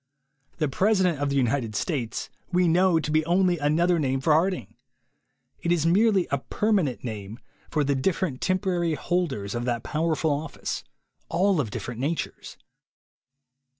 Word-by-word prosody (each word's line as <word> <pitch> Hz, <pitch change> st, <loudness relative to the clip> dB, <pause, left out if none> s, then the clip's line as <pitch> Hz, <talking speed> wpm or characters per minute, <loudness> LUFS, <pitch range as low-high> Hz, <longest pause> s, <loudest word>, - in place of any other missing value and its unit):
The 155 Hz, -, +1 dB
President 185 Hz, 0 st, +2 dB
of 145 Hz, 0 st, 0 dB
the 140 Hz, -, -1 dB
United 125 Hz, -4 st, 0 dB
States 125 Hz, -, -2 dB, 0.2 s
we 180 Hz, 0 st, +3 dB
know 175 Hz, 0 st, +4 dB
to 150 Hz, -, -3 dB
be 155 Hz, +1 st, +3 dB
only 180 Hz, -1 st, +3 dB
another 165 Hz, +4 st, +2 dB
name 135 Hz, -2 st, 0 dB
for 155 Hz, +3 st, +3 dB
Harding. 165 Hz, -, 0 dB, 0.9 s
It 170 Hz, -, 0 dB
is 170 Hz, -3 st, +2 dB
merely 195 Hz, +1 st, +4 dB
a 140 Hz, -, +1 dB
permanent 190 Hz, -, 0 dB
name 110 Hz, -2 st, -6 dB, 0.3 s
for 155 Hz, -2 st, +1 dB
the 140 Hz, 0 st, +1 dB
different 140 Hz, 0 st, -1 dB
temporary 180 Hz, -3 st, 0 dB
holders 150 Hz, -, -2 dB
of 120 Hz, 0 st, -3 dB
that 120 Hz, -2 st, -1 dB
power 160 Hz, +1 st, 0 dB
ful 160 Hz, 0 st, 0 dB
office, 145 Hz, +1 st, -3 dB, 0.5 s
all 180 Hz, 0 st, +2 dB
of 115 Hz, -, -4 dB
different 120 Hz, +3 st, -5 dB
natures. 155 Hz, +4 st, -3 dB
160 Hz, 150 wpm, -26 LUFS, 135-180 Hz, 0.9 s, know